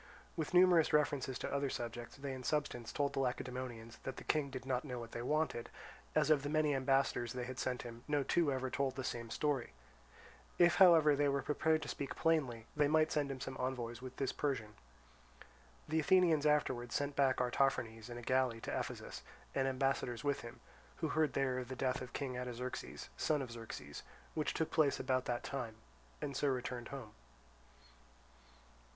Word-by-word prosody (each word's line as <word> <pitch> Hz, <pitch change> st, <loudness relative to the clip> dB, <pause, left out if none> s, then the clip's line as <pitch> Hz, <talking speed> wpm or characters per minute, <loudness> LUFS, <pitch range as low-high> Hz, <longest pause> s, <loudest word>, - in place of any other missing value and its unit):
With 160 Hz, -3 st, -2 dB
numerous 175 Hz, -3 st, +6 dB
references 145 Hz, -3 st, +2 dB
to -, -, -4 dB
other 140 Hz, 0 st, +1 dB
subjects, 120 Hz, 0 st, -5 dB
they 140 Hz, -1 st, -4 dB
in 130 Hz, -, -6 dB
substance 125 Hz, -4 st, -1 dB
told 145 Hz, -1 st, 0 dB
the -, -, -1 dB
Lacedaemonians 125 Hz, -3 st, -3 dB
that 135 Hz, -, -5 dB
the -, -, -7 dB
King 150 Hz, -3 st, +1 dB
did 130 Hz, -1 st, -6 dB
not 130 Hz, -1 st, 0 dB
know 125 Hz, -4 st, -5 dB
what 115 Hz, -1 st, -7 dB
they 120 Hz, -, -4 dB
wanted, 150 Hz, -2 st, 0 dB, 0.5 s
as 155 Hz, 0 st, +4 dB
of 150 Hz, -2 st, +5 dB
the 145 Hz, -, -3 dB
many 155 Hz, -1 st, +2 dB
ambassadors 135 Hz, -3 st, +1 dB
they 125 Hz, -1 st, -3 dB
had 130 Hz, +1 st, -6 dB
sent 125 Hz, -1 st, -1 dB
him 120 Hz, 0 st, -9 dB
no 145 Hz, -2 st, +2 dB
two 160 Hz, 0 st, +2 dB
ever 130 Hz, -1 st, -2 dB
told 135 Hz, -1 st, 0 dB
the 130 Hz, -, -3 dB
same 115 Hz, -2 st, -4 dB
story; 135 Hz, -, -1 dB, 0.8 s
if 175 Hz, -1 st, +5 dB
however 165 Hz, -6 st, +8 dB
they 145 Hz, 0 st, +3 dB
were 140 Hz, 0 st, 0 dB
prepared 155 Hz, +1 st, +2 dB
to -, -, -6 dB
speak 140 Hz, -, -4 dB
plainly 135 Hz, -9 st, +1 dB
they 150 Hz, -1 st, +4 dB
might 155 Hz, +1 st, +3 dB
send 145 Hz, -2 st, +1 dB
him 135 Hz, -1 st, -4 dB
some 130 Hz, +1 st, -5 dB
envoys 125 Hz, -2 st, -3 dB
with 130 Hz, 0 st, -8 dB
this 135 Hz, -, -1 dB
Persian. 120 Hz, -8 st, -2 dB, 1.1 s
The 160 Hz, +1 st, +1 dB
Athenians 160 Hz, -2 st, +4 dB
afterwards 130 Hz, -5 st, +1 dB
sent 145 Hz, 0 st, -1 dB
back 135 Hz, -2 st, +3 dB
Artaphernes 125 Hz, -3 st, 0 dB
in 120 Hz, -, -6 dB
a 120 Hz, -, -8 dB
galley 130 Hz, -2 st, +2 dB
to -, -, -3 dB
Ephesus, -, -, -5 dB, 0.3 s
and 135 Hz, 0 st, +1 dB
ambassadors 130 Hz, -2 st, 0 dB
with 145 Hz, -1 st, 0 dB
him, 120 Hz, +1 st, -10 dB, 0.3 s
who 160 Hz, -, -2 dB
heard 155 Hz, -1 st, +2 dB
there 130 Hz, -2 st, +1 dB
of 125 Hz, -, -5 dB
the 130 Hz, -, -5 dB
death 130 Hz, 0 st, 0 dB
of 130 Hz, 0 st, -7 dB
King 135 Hz, -3 st, -3 dB
Artaxerxes, 125 Hz, 0 st, -5 dB
son 150 Hz, -3 st, +1 dB
of 125 Hz, -, -7 dB
Xerxes, 110 Hz, -11 st, -7 dB, 0.3 s
which 155 Hz, -, -1 dB
took 160 Hz, -, -1 dB
place 150 Hz, -4 st, +3 dB
about 130 Hz, -1 st, +1 dB
that 120 Hz, -1 st, -2 dB
time, 120 Hz, -5 st, -4 dB, 0.5 s
and 140 Hz, -2 st, -3 dB
so 145 Hz, -, +1 dB
returned 125 Hz, -2 st, -2 dB
home. 130 Hz, -6 st, -7 dB
135 Hz, 190 wpm, -36 LUFS, 125-145 Hz, 1.1 s, however